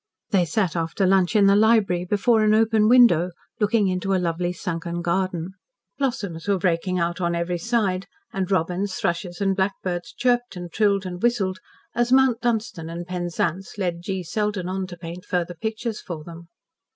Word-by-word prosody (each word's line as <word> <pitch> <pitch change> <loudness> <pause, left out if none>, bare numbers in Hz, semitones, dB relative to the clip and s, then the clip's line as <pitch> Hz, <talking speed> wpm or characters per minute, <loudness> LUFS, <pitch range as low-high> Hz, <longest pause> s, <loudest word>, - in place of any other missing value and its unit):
They 190 -4 +3
sat 185 -2 0
after 165 +3 0
lunch 190 +1 +3
in 205 -2 +6
the 200 0 +6
library, 205 -5 +3
before 215 +4 +2
an 215 0 +4
open 220 -1 +3
window, 230 -9 +6 0.3
looking 210 -1 +2
into 185 +1 0
a - - +3
lovely 175 0 -1
sunken 170 -1 -4
garden. 180 0 -1 0.5
Blossoms 205 -11 -2
were 200 -1 +3
breaking 180 +1 0
out 170 +1 -1
on 170 -1 0
every 170 +1 -1
side, 195 -3 0 0.3
and 190 -2 -2
robins, 185 +1 0
thrushes, 175 +1 -2
and 195 -1 +1
blackbirds 190 -2 -2
chirped 245 -2 0
and 175 -1 -7
trilled 200 -2 +2
and 180 0 -6
whistled, 200 -6 +1 0.3
as 240 +1 0
Mount 260 -3 +4
Dunstan 220 -9 -1
and 170 +1 -5
Penzance 175 +1 -3
led 175 -4 -2
G. 190 0 -3
Selden 205 +1 -2
on 190 0 -3
to 175 -1 -9
paint 170 +1 -8
further 175 -1 -2
pictures 220 +5 -4
for 160 -4 -7
them. 170 +1 -11
185 Hz, 175 wpm, -23 LUFS, 175-210 Hz, 0.5 s, in